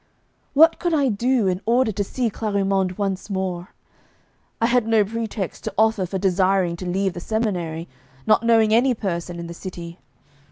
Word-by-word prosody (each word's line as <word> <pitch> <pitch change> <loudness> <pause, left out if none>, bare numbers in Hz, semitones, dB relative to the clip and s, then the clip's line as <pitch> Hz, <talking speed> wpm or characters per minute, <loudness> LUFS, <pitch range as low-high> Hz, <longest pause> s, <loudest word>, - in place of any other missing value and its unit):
What 320 +3 +6
could 345 -2 0
I 280 -3 +2
do 240 +2 +1
in 185 0 0
order 240 0 +3
to 205 0 -2
see 235 +3 -2
Clarimonde 195 -3 -1
once 195 -1 -3
more? 185 -2 -3 0.9
I 225 - +2
had 240 -1 +2
no 220 -2 +3
pretext 220 -3 -4
to - - -3
offer 220 -3 +2
for 190 - -3
desiring 190 -1 +1
to 185 - -6
leave 190 +1 0
the 175 - -6
seminary, 175 -6 -2 0.4
not 215 - +4
knowing 225 -2 +3
any 245 +2 +3
person 175 -4 -4
in 170 - -6
the 170 - -7
city. 170 -1 -8
200 Hz, 170 wpm, -22 LUFS, 185-225 Hz, 0.9 s, What